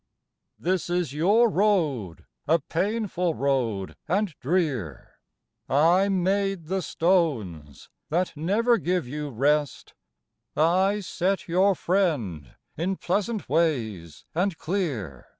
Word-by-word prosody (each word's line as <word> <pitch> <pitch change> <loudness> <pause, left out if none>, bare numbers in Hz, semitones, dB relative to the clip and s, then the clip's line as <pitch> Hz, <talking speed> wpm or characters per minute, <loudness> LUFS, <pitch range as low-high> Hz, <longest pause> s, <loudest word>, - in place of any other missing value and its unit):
This 180 0 -1
is 175 -6 -1
your 205 +10 +4
road 165 - 0 0.2
â 160 - +6
a - - +2
painful 180 0 -1
road 120 -8 -1
and 200 -1 0
drear. 135 - -2 0.5
I 170 +8 +4
made 195 -1 0
the 190 +4 -1
stones 120 - -1
â - - -49
that 175 +2 0
never 215 +9 +2
give 180 -5 -1
you 150 +3 -4
rest; 145 +3 0 0.6
I 190 +6 +3
set 190 +1 -1
your 185 +3 +3
friend 140 - -1 0.2
in 180 +5 -1
pleasant 205 +4 -2
ways 115 - -1
and 180 +1 0
clear. 140 - -3
170 Hz, 115 wpm, -25 LUFS, 135-190 Hz, 0.6 s, â